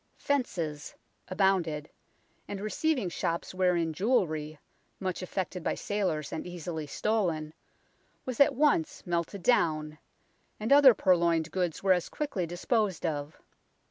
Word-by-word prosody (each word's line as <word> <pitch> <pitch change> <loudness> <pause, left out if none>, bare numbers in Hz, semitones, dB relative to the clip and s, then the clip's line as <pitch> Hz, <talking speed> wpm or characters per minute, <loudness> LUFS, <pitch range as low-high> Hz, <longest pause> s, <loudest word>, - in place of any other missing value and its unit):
" - - -38
Fences 170 - -1 0.2
" - - -44
abounded, 180 -6 +1 0.6
and 200 - -5
receiving 245 - 0
shops 170 0 -3
wherein 180 -3 +1
jewellery, 155 -7 0 0.4
much 185 -2 -3
affected 185 -1 -4
by - - 0
sailors 180 -8 -2
and 160 - -4
easily 170 -3 -5
stolen, 165 -5 -1 0.7
was 255 -3 -4
at 280 - +5
once 285 - +1
melted 175 +2 -2
down, 155 -9 +1 0.6
and 220 +5 +2
other 280 -4 +8
purloined 170 -4 +2
goods 180 -3 -2
were 190 -1 +5
as 180 -1 -2
quickly 210 - -3
disposed 190 +2 -1
of. 150 -1 -3
180 Hz, 130 wpm, -29 LUFS, 160-205 Hz, 0.7 s, other